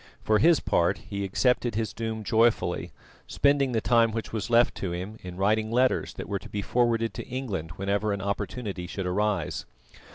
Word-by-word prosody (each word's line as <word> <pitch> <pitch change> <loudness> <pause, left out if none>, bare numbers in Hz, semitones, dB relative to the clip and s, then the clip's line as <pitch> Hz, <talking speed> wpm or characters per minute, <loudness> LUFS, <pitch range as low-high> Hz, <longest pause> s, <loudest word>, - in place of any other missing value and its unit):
For 110 -1 +3
his 165 +6 +5
part, 90 +3 +1
he 100 +1 -5
accepted 120 +4 +1
his 110 0 -1
doom 110 -1 -4
joyfully, 115 +1 +1 0.4
spending 140 -2 +2
the 115 -2 0
time 115 -1 +4
which 115 0 -5
was 110 +1 -3
left 120 +1 +4
to 95 - -3
him 95 +5 -6
in 90 -1 -8
writing 110 +3 +1
letters 125 +2 +1
that - - -6
were 100 0 -2
to - - -12
be 100 -1 -3
forwarded 115 -1 +1
to - - -7
England 100 -11 -4
whenever 100 +2 0
an 100 - -1
opportunity 100 -1 -3
should 95 +3 -4
arise. 105 +3 -1
110 Hz, 185 wpm, -27 LUFS, 100-115 Hz, 0.4 s, his